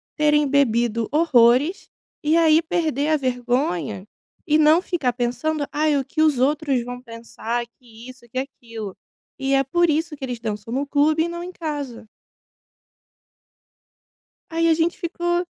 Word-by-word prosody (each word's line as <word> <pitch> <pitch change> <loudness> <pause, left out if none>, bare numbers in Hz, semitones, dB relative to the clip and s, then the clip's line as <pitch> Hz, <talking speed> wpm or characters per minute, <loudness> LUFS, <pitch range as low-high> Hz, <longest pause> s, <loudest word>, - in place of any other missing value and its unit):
terem 295 -1 +3
bebido 235 -5 +1
horrores 290 - +3 0.3
e 310 +2 +3
aí 320 -1 +5
perder 315 -3 -1
a 310 - +3
vergonha." 245 - -1 0.4
E 305 - +3
não 310 +2 +5
ficar 320 -10 -1
pensando: 250 +5 -1
"Aí 300 -1 +1
o 270 - -2
que 310 - -2
os 305 -4 +3
outros 280 -1 +1
vão 245 +1 -7
pensar." 230 0 -5
Que 235 -1 -14
isso 255 -1 -14
que 255 - -7
aquilo, 230 -7 -7 0.4
e 270 0 0
é 270 0 +4
por 345 +6 +2
isso 315 +1 0
que 275 - -12
eles 250 -3 -4
dançam 215 0 -5
no 275 +3 -1
clube 300 +3 +2
e 340 - -2
não 345 0 -5
em 360 - -7
casa. 290 -10 -6 2.4
Aí 330 0 +1
a 325 - +5
gente 330 +2 0
ficou: 345 0 -1
280 Hz, 155 wpm, -22 LUFS, 240-315 Hz, 2.4 s, aí